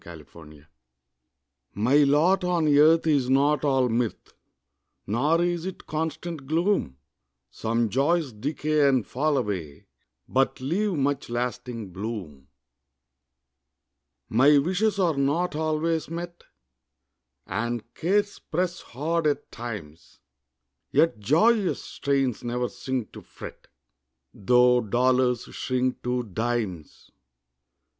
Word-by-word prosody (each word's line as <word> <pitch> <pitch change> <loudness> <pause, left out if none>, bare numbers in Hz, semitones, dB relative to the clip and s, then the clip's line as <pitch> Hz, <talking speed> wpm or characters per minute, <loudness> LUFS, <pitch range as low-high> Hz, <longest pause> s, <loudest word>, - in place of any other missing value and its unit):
MY 85 - -10
LOT 75 -1 -15 1.1
My 120 +8 +3
lot 150 +7 +4
on 175 -3 +1
earth 160 +3 +5
is 140 -5 +2
not 140 +2 +3
all 135 -3 +2
mirth, 115 -1 -2 0.7
Nor 150 +11 +1
is 175 0 -1
it 190 - -8
constant 160 -1 -4
gloom; 165 - 0 0.5
Some 115 - -1
joys 140 +3 +1
decay 145 +5 +1
and 130 -5 +1
fall 145 +3 0
away, 95 - -4 0.4
But 135 +1 +1
leave 185 +10 -1
much 140 -4 -1
lasting 120 -3 -4
bloom. 95 - -6 1.8
My 140 +6 +5
wishes 190 +8 +1
are 175 -5 +2
not 145 +5 0
always 155 0 -1
met, 175 +1 -7 1.0
And 120 0 -4
cares 205 +4 0
press 175 +1 -2
hard 155 +5 -2
at 145 -1 -2
times; 90 -10 -8 0.7
Yet 165 -9 +2
joyous 190 - +3
strains 135 -4 -1
ne'er 125 +1 -2
sink 130 -4 -4
to - - -11
fret, - - -11 0.7
Tho' 125 +4 +4
dollars 125 +2 +2
shrink 130 0 -1
to 125 0 -1
dimes. 110 -6 -4
135 Hz, 105 wpm, -25 LUFS, 120-160 Hz, 1.8 s, earth